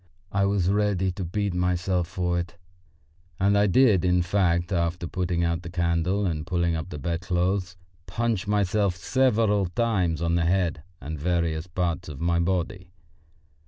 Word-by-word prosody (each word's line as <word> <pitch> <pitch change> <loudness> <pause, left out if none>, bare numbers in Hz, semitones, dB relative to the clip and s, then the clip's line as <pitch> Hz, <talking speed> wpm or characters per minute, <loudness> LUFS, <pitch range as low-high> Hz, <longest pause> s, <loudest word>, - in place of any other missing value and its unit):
I 100 0 +2
was 100 -3 +1
ready 100 -2 +1
to 95 +1 -5
beat 100 +3 -2
myself 90 0 0
for 90 0 -1
it, 85 0 -6 0.8
and 100 +2 +3
I 100 0 +4
did, 105 -2 +4
in 90 -1 +3
fact, 85 -1 +1
after 85 -1 -1
putting 90 0 -1
out 85 0 0
the 85 - -8
candle 85 +3 0
and 80 -3 -2
pulling 85 -1 0
up 80 +3 -4
the 90 - -6
bedclothes, 90 +3 -1 0.3
punch 110 +2 -1
myself 100 -2 +1
several 105 -1 +2
times 90 -4 0
on 85 0 0
the 85 -1 +2
head 85 -3 +1 0.2
and 75 +1 -6
various 85 0 -1
parts 90 0 -2
of 70 -3 -8
my 85 0 +1
body. 90 +1 -2
90 Hz, 160 wpm, -25 LUFS, 85-95 Hz, 0.8 s, I